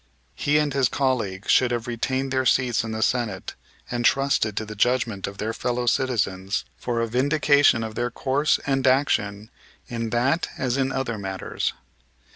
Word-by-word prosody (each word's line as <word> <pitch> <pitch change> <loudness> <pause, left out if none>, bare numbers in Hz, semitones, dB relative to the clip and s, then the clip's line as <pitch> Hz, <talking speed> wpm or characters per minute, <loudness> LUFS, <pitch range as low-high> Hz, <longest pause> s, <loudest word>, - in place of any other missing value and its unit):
He 145 +1 +1
and 150 -2 +1
his 135 -2 +2
colleague 115 -8 -1
should 125 - +4
have 120 -1 -2
retained 130 +2 -2
their 130 0 +2
seats 125 -3 +2
in 115 - -5
the 110 0 -1
Senate 115 -7 -1 0.4
and 120 0 -1
trusted 135 -6 +2
to 110 - -1
the 105 - -7
judgment 115 -3 0
of 100 0 -8
their 110 +2 -2
fellow 125 +1 -2
citizens 105 -7 0
for 120 -1 -2
a 115 - 0
vindication 140 0 +3
of 110 -1 -5
their 120 +2 -1
course 140 +5 +1
and 135 -1 +1
action 110 -6 +1 0.4
in 115 -1 -3
that 130 +8 +1
as 130 -1 -1
in 135 -1 0
other 120 -5 -2
matters. 95 -1 -3
120 Hz, 170 wpm, -24 LUFS, 110-135 Hz, 0.4 s, should